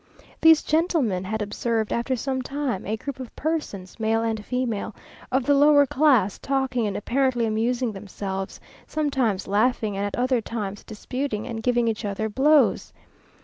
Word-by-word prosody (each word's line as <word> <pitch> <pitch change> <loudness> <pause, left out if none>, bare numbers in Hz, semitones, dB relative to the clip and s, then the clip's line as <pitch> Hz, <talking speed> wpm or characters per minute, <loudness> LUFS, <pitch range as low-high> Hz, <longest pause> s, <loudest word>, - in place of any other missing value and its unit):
These 320 -1 +7
gentlemen 305 - +1
had 220 +2 -2
observed, 220 +1 -1
for 260 - +1
some 260 +1 -2
time, 270 -7 -3
a 220 +2 -1
group 275 +3 -6
of 255 -3 -8
persons, 270 - -4
male 225 +1 +1
and 220 -2 -2
female, 230 -4 -2 0.4
of 260 -1 +1
the 285 - +4
lower 290 0 +6
class, 270 -9 +3
talking 265 -4 0
and 200 - -3
apparently 250 +1 +1
amusing 235 +2 0
themselves; 195 -1 -6 0.3
sometimes 265 -10 0
laughing, 215 0 +1
and 200 - -2
at 205 - -2
other 250 -1 +1
times 205 -3 -5
disputing 225 +1 -4
and 230 -3 -5
giving 240 0 +1
each 225 0 -2
other 210 +1 -2
blows. 285 +6 +3
235 Hz, 155 wpm, -24 LUFS, 210-270 Hz, 0.4 s, These